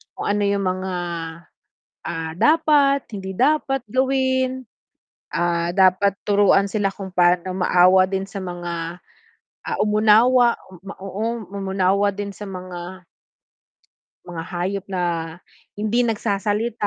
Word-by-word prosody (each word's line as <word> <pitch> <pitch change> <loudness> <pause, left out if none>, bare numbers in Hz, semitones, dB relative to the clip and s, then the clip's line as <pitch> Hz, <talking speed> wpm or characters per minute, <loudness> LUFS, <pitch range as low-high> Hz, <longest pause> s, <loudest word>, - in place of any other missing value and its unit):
kung - - -4
ano 205 0 +1
yung 200 0 +1
mga, 185 0 -2 1.1
ah, 160 0 -4
dapat, 290 - +3
hindi 190 -1 -5
dapat 270 +1 +1
gawin. 260 0 0 0.6
Ah, 175 +1 -1
dapat 190 +1 +4
turuan 200 -1 +4
sila 205 -2 +1
kung 195 -1 -8
paano 180 0 +2
maawa 185 +1 +5
din 190 0 -2
sa 195 0 -7
mga, 175 -2 -5 0.7
ah, - - -3
umunawa 220 +4 +4 0.3
ma 195 - -8
oo 210 +3 -4
umunawa 195 0 0
din 205 +1 -5
sa 210 - -7
mga 185 -1 -8 1.2
mga 170 -2 -5
hayop 185 +2 -2
na 185 -2 -2 0.8
hindi 215 +3 +1
nagsasalita 210 0 -1
200 Hz, 115 wpm, -21 LUFS, 185-225 Hz, 1.2 s, maawa